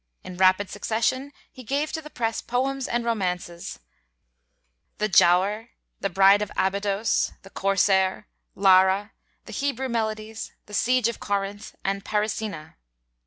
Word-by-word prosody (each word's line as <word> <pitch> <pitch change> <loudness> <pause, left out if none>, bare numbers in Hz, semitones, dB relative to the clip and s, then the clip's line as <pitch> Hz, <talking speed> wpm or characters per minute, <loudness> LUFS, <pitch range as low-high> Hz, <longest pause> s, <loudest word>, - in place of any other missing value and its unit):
In 185 - -8
rapid 185 +2 +4
succession 255 +5 -1 0.2
he 255 - -12
gave 280 +6 -1
to 320 - -3
the 300 - -11
press 230 -5 -2
poems 265 +2 -1
and 240 0 -1
romances, 180 -6 -3 1.2
'The 215 0 0
Giaour,' 195 +5 +4 0.3
'The 195 - -1
Bride 195 +2 +5
of 210 - -3
Abydos,' 200 +3 0
'The 195 - -13
Corsair,' 195 0 +1 0.3
'Lara,' 190 +1 +4 0.3
the - - -10
'Hebrew 265 -2 -2
Melodies,' 220 -1 -3
'The 210 - -14
Siege 250 +2 +2
of 235 - -4
Corinth,' 200 +1 -3
and 195 0 -2
'Parisina.' 210 - -3
210 Hz, 130 wpm, -25 LUFS, 195-235 Hz, 1.2 s, Bride